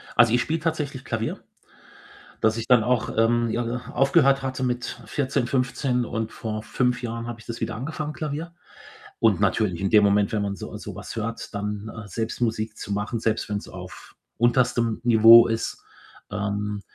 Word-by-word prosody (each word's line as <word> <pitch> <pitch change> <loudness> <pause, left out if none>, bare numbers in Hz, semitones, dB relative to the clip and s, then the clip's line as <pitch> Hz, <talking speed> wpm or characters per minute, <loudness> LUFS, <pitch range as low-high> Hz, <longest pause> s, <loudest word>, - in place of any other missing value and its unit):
Also, 120 -2 +5
ich 120 - +4
spiele 160 +6 -1
tatsächlich 150 -5 -3
Klavier, 110 -1 -3 1.0
das 110 0 +2
ich 115 - -4
dann 125 -3 +5
auch, 120 -1 0
ähm, 115 +1 +3
j 120 - 0 0.3
aufgehört 135 -1 +4
hatte 130 0 -3
mit 125 0 -3
14, 130 -3 -1
15 125 -1 0
und 110 -1 -3
vor 110 -1 -5
5 125 -1 0
Jahren 115 0 -4
habe 120 -1 -6
ich - - -15
das 115 - -7
wieder 115 - -2
angefangen, 150 +5 -4
Klavier. 155 +3 -5 0.7
Und - - +3
natürlich, 95 -6 +1
in 95 - 0
dem 105 0 +6
Moment, 100 0 +3
wenn 110 - 0
man 100 -1 -2
so - - -8
so - - -8
was - - -8
hört, 115 0 -5
dann, 105 +1 -4
äh, 110 -2 -8
selbst 110 +5 -4
Musik 110 -2 -1
zu - - -7
machen, 105 +3 -2
selbst 110 -1 -1
wenn's 100 -1 -3
auf - - -11 0.2
unterstem 120 -1 +2
Niveau 115 0 +8
ist, 115 0 -3 0.5
ähm, 105 0 -2
115 Hz, 175 wpm, -24 LUFS, 110-125 Hz, 1.0 s, Niveau